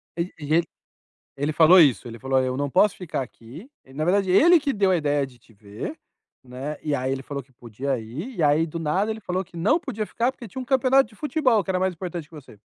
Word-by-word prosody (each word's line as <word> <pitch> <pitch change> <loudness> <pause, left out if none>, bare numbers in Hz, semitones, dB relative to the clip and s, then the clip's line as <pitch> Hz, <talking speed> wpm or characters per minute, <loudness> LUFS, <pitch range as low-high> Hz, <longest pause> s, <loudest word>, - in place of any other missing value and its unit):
Ele 170 +2 -3
ele 155 +3 +2 0.7
ele 145 +2 -1
falou 170 +4 +7
isso? 125 - +4
Ele 115 -1 -9
falou: 135 0 +1
"Eu 130 0 -2
não 145 -1 -1
posso 190 +6 +3
ficar 170 -7 -4
aqui", 130 - -11 0.2
e 130 - -17
na 155 +3 -2
verdade, 190 +1 +2
ele 335 - +6
que 285 -2 -1
deu 200 -2 +2
a 180 - +3
ideia 145 -2 0
de 125 -2 -16
te 115 - -23
ver, 105 - -8 0.5
né, 130 +4 -6
e 150 - -1
aí, 130 0 -2
ele 135 0 -3
falou 140 +1 -5
que 130 - -30
podia 125 +3 -4
ir, 150 - -7
e 165 - 0
aí, 150 +2 +3
do 160 - -6
nada 180 +7 0
ele 220 - -5
falou 185 -1 -2
que 175 - -19
não 215 - +2
podia 215 - -4
ficar, 240 +4 -1
porque 240 -3 -11
tinha 260 - -7
um 255 - -7
campeonato 265 0 +3
de 215 - -19
futebol 275 -7 +1
que 190 - -2
era 185 - 0
mais 185 0 0
importante 170 -2 -6
que 165 - -14
você. 130 -8 -14
165 Hz, 250 wpm, -24 LUFS, 135-205 Hz, 0.7 s, falou